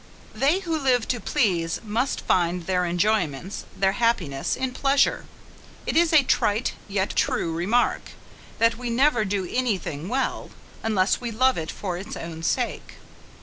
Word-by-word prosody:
They 305 +8 +2
who 330 -4 -2
live 250 -4 +2
to 245 - 0
please 175 -6 0
must 230 +5 -1
find 175 0 +1
their 180 0 0
enjoyments, 175 -2 -1
their 195 0 +3
happiness, 190 -12 0
in 260 0 -3
pleasure! 275 +1 +2 0.6
It - - -2
is 335 0 +4
a 310 -3 +6
trite, 215 -2 +1
yet 200 -1 -1
true 165 - 0
remark, 200 +9 +1 0.6
that 230 +1 +2
we 245 -1 -4
never 245 -1 +3
do 195 -2 -1
any 245 -3 0
thing 160 0 -6
well, 260 +2 -2 0.3
unless 205 -2 +1
we 240 - -3
love 255 +4 +2
it 160 -1 -4
for 180 -3 -4
its 200 +3 -7
own 165 -1 -7
sake. 240 +8 -2
215 Hz, 155 wpm, -24 LUFS, 180-250 Hz, 0.6 s, a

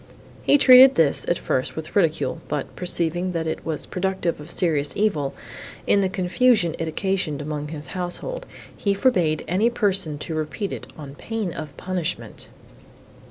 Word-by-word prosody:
He 285 - +5
treated 260 0 +8
this, 160 -4 +2
at 175 - +1
first, 130 - -1
with 160 -1 -7
ridicule, 165 -3 +1
but, 145 -2 -4
perceiving, 175 0 -1
that 165 -1 -2
it 160 - -3
was 155 -2 -4
productive 185 -3 -2
of 150 - -10
serious 155 -5 0
evil, 155 -10 0 0.5
in 200 - +4
the 190 - +1
confusion 190 0 +2
it 165 - -2
occasioned 160 -3 -1
among 150 0 -4
his 150 -1 -7
household, 185 - -4 0.3
he 200 -1 0
forbade 180 -10 +1
any 200 +7 +2
person 195 -9 0
to 160 - -5
repeat 155 +6 -3
it, - - -7
on 145 -3 -9
pain 215 +2 -4
of 150 -2 -8
punishment. 180 -3 -4
175 Hz, 160 wpm, -23 LUFS, 155-195 Hz, 0.5 s, treated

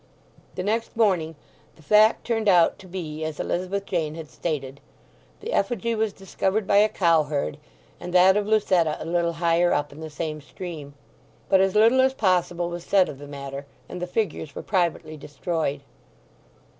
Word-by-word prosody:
The 180 - -3
next 225 +3 -2
morning 180 -8 +2 0.4
the 160 - -20
fact 215 +6 +4
turned 225 -3 +1
out 175 -3 +4
to 190 - -13
be 160 -4 -6
as 155 -1 -5
Elizabeth 190 +3 -2
Jane 160 -5 -2
had 160 -5 -9
stated; 140 -2 -4 0.6
the 455 +4 -5
effigy 230 +2 0
was 220 -1 0
discovered 195 +2 -2
by 200 - +3
a 210 +1 +5
cowherd, 155 -6 +1 0.4
and 180 0 -7
that 185 +1 +6
of 210 0 0
Lucetta 185 -7 +2
a - - -6
little 170 0 0
higher 170 +1 +2
up 145 0 -1
in 145 - -12
the 160 0 -7
same 155 0 -5
stream. 150 -2 -8 0.5
But 190 - +5
as 195 0 +1
little 230 +5 +5
as 265 0 +2
possible 175 -4 +1
was 175 0 -6
said 190 -1 +3
of 140 - -9
the 145 - -10
matter, 140 0 -7 0.2
and 180 - -7
the 180 - -3
figures 180 -7 -3
were - - -6
privately 170 -4 -1
destroyed. 145 0 -3
175 Hz, 175 wpm, -24 LUFS, 155-200 Hz, 0.6 s, that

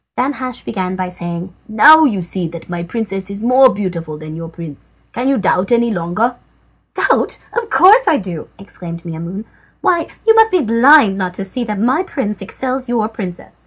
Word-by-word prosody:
Danhasch 255 -1 -3
began 185 -3 -3
by 185 -1 -3
saying: 175 0 -6 0.2
"Now 310 +9 +7
you 205 -10 0
see 175 0 -3
that 165 0 -10
my 175 -1 -4
princess 195 0 -4
is 200 0 -6
more 255 +3 +5
beautiful 170 -6 -4
than 155 0 -9
your 165 0 -7
prince. 165 -3 -10 0.2
Can 245 +2 -2
you 275 - +2
doubt 190 0 +1
any 235 0 +3
longer?" 210 +7 -1 0.6
"Doubt! - - +1 0.2
Of 470 -2 -2
course 435 +7 +6
I 310 - +4
do!" 180 - -6
exclaimed 170 -4 -9
Maimoune. 170 +5 -6 0.4
"Why, 340 -2 +1 0.2
you 450 - +6
must 445 0 +5
be 365 -4 +2
blind 230 -2 +5
not 180 -1 -3
to 195 - -4
see 235 +6 -4
how 210 -2 -3
much 205 +3 -1
my 260 +7 +2
prince 210 - -4
excels 260 +5 -4
your 230 -3 0
princess. 190 - -8
205 Hz, 190 wpm, -16 LUFS, 180-255 Hz, 0.6 s, Now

